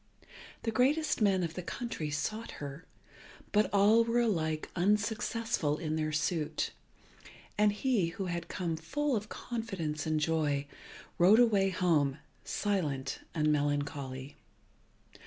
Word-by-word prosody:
The 225 - 0
greatest 275 +5 +2
men 195 -3 +3
of 165 -1 -3
the 180 - -4
country 180 -4 -4
sought 215 +10 -3
her, 145 +3 -8 0.6
but 210 +1 +3
all 205 +3 +5
were 230 +1 +2
alike 160 -9 0
unsuccessful 210 -3 +1
in 155 -1 -2
their 155 -1 -1
suit, 155 +1 -1 0.8
and 210 0 +4
he 210 -4 +1
who 190 +3 -4
had 170 -2 -3
come 170 -3 -2
full 280 - -1
of 210 0 -3
confidence 175 -11 -4
and 155 -1 +1
joy, 150 -2 +1 0.5
rode 190 +5 +7
away 210 -5 +4
home 160 -7 +2 0.3
silent 150 -10 -1 0.2
and 155 -1 +2
melancholy. 145 -2 -2
175 Hz, 125 wpm, -31 LUFS, 150-215 Hz, 0.8 s, rode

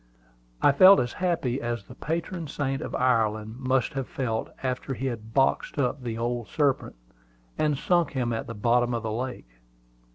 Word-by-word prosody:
I 145 - +7
felt 185 +7 +8
as 120 -1 -1
happy 165 -9 -1
as 120 -2 -3
the 125 - -12
patron 165 +3 -3
saint 135 -1 -2
of - - -4
Ireland 110 -2 +1
must 130 -1 +1
have 135 -2 -3
felt 120 -7 -2
after 130 +1 -2
he 130 - -4
had 110 -3 -5
boxed 135 +2 +2
up 140 0 0
the 115 -2 -4
old 120 0 -2
serpent, 145 -4 0 0.6
and 150 -2 +1
sunk 175 +2 +1
him 125 -3 -1
at 115 - -3
the 115 - -6
bottom 120 +3 +2
of 115 - -3
the 110 - -2
lake. 110 - -5
125 Hz, 175 wpm, -26 LUFS, 115-140 Hz, 0.6 s, felt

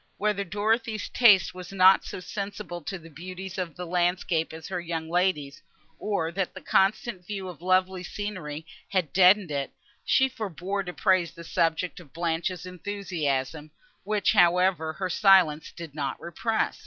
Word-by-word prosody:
Whether 210 -1 0
Dorothée's 215 +3 -1
taste 195 -9 +5
was 180 0 -9
not 190 0 +6
so - - -6
sensible 200 -2 -6
to 195 - -4
the 165 -1 -14
beauties 185 +4 -7
of 175 -3 -4
landscape 175 -1 0
as 160 0 -9
her 180 -2 -3
young 165 -2 -4
lady's, 175 -6 0 0.4
or 170 -6 -1
that 190 +1 -3
the - - -6
constant 195 0 +1
view 195 -3 -4
of 175 -4 -9
lovely 185 0 +2
scenery 180 -6 -5 0.2
had 185 -6 -1
deadened 185 -1 +5
it, 140 -1 -3 0.3
she 265 - +3
forbore 200 - -4
to 180 - -4
praise 175 -6 +2
the 170 - -10
subject 165 +2 0
of 155 -6 -16
Blanche's 170 +1 -2
enthusiasm, 160 -6 -3 0.3
which, 210 0 +1
however, 180 -4 +3
her 185 +3 -3
silence 180 -5 +4
did 165 -4 -9
not 140 -3 -3
repress. 220 +6 -2
180 Hz, 155 wpm, -27 LUFS, 165-195 Hz, 0.4 s, not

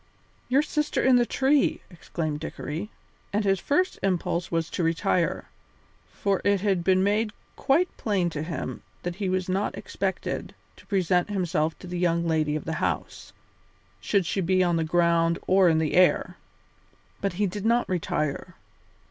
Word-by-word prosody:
"Your 270 +4 +4
sister 300 0 -1
in 260 -1 +6
the 240 -1 +2
tree!" 275 +4 +2
exclaimed 160 -3 -4
Dickory. 160 +4 -5 0.4
And 210 +1 0
his 195 -1 +2
first 365 - 0
impulse 180 -2 -1
was 165 -1 0
to - - -2
retire, 165 +1 0 0.7
for 200 -2 -1
it 200 -2 +2
had 195 -4 +1
been 185 +1 +3
made 210 +2 +1 0.2
quite 330 +7 +1
plain 190 -6 0
to 150 - -4
him 155 -6 -5 0.2
that 175 0 -4
he 195 -2 -1
was 185 0 -1
not 190 +2 -1
expected - - -3 0.2
to - - -18
present 185 -2 +1
himself 170 -5 0
to - - -12
the 175 0 -4
young 170 -1 +1
lady 155 -2 +1
of 155 - -4
the 160 - -2
house, - - -3 0.7
should 200 -4 +1
she 195 - -1
be 185 +1 +2
on 175 -1 +2
the 165 - +1
ground 170 0 +2
or 190 -1 +5
in 160 - +3
the 160 -2 0
air. 180 0 +3 0.9
But 195 -2 -1
he 205 +4 0
did 200 +1 -4
not 235 +2 +2
retire. 155 -5 -2
180 Hz, 165 wpm, -26 LUFS, 165-205 Hz, 0.9 s, in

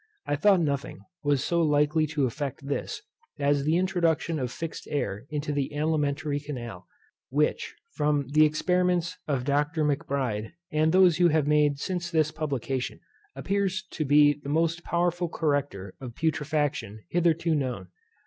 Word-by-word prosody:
I - - 0
thought 190 +4 +4
nothing 150 0 -2 0.2
was 145 -2 +2
so 170 +2 +1
likely 150 0 +2
to 150 -2 0
effect 140 +1 -4
this, 145 - -3 0.3
as 145 -1 +2
the 160 +3 +3
introduction 170 -3 +1
of 125 -2 -2
fixed 165 +5 -6
air 120 -5 -3
into 150 0 -3
the 140 -2 -1
alimentary 150 -1 0
canal, 120 -10 -7 0.4
which, 150 +3 0 0.2
from 145 -1 +1
the 155 +2 +5
experiments 180 +3 +1
of 135 -4 0
Dr. 150 +3 +1
Macbride, 140 -6 -1 0.2
and 155 +1 +2
those 180 -2 +5
you 175 - +6
have 155 -3 +2
made 150 -1 +3
since 175 +3 -3
his 155 -3 +2
publication, 135 -4 -3 0.4
appears 200 0 -1
to 155 - -2
be 145 +1 +5
the 140 - -7
most 165 +3 +1
powerful 175 0 0
corrector 145 - -1
of 120 -3 -7
putrefaction 145 -9 -1
hitherto 165 -1 +2
known. 125 - -2
150 Hz, 150 wpm, -27 LUFS, 140-165 Hz, 0.4 s, you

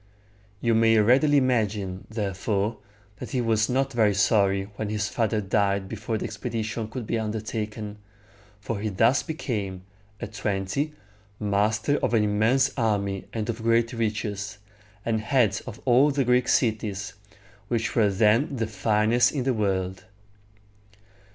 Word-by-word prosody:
You 115 -1 +2
may 115 0 +4
readily 130 +7 +4
imagine, 105 -8 0
therefore, 105 0 -2 0.4
that - - -6
he 130 - -1
was 110 -2 +1
not 135 +2 0
very 110 -4 +3
sorry 100 -1 +3
when 105 +1 -3
his 105 -1 -1
father 110 -1 0
died 100 -1 0
before 110 +2 -3
the - - -4
expedition 110 -1 -4
could 115 +1 -6
be 115 - -1
undertaken; 110 -1 -4 0.6
for 105 0 -4
he 110 +1 -2
thus 115 +7 +3
became, 105 - -4 0.4
at 105 - -7
twenty, 105 +10 -2 0.5
master 105 +6 +1
of - - 0
an 110 - +3
immense 115 +6 +2
army 100 -5 -1
and 110 -2 -3
of 115 -1 -3
great 115 +1 +2
riches, 105 -3 -3 0.5
and 110 -2 0
head 110 -4 +2
of 115 -3 -7
all 130 +3 +5
the 140 -2 0
Greek 125 0 +3
cities, 105 -5 0 0.5
which 115 0 -1
were 110 -3 +4
then 110 +8 +2
the 115 -3 -1
finest 110 +3 +2
in 140 -4 -2
the 130 0 +1
world. 95 -4 -1
110 Hz, 145 wpm, -25 LUFS, 105-120 Hz, 0.6 s, all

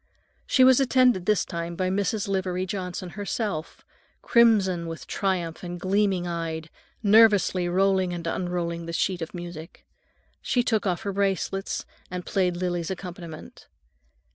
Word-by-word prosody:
She 260 - +4
was 260 0 +7
attended 250 -8 +3
this 210 -2 +3
time 170 0 -5
by 185 +1 -1
Mrs. 200 +2 -1
Livery 185 -1 -1
Johnson 185 -2 -4
herself, 200 -5 -4 0.4
crimson 200 -8 +4
with 165 -1 -7
triumph 180 -4 -2
and 175 -1 -6
gleaming 190 -1 +1
eyed, 165 -2 -4 0.3
nervously 205 -4 +5
rolling 190 0 +2
and 170 -1 -5
unrolling 170 -1 -2
a - - -4
sheet 180 +1 0
of 165 +3 -5
music. 175 -1 -9 0.6
She 245 - +1
took 220 -4 0
off 180 -2 -1
her 200 - -2
bracelets 195 0 -1 0.2
and 180 0 -5
played 180 -2 0
Lily's 175 -2 -2
accompaniment. 175 -4 -8
185 Hz, 140 wpm, -26 LUFS, 175-200 Hz, 0.6 s, was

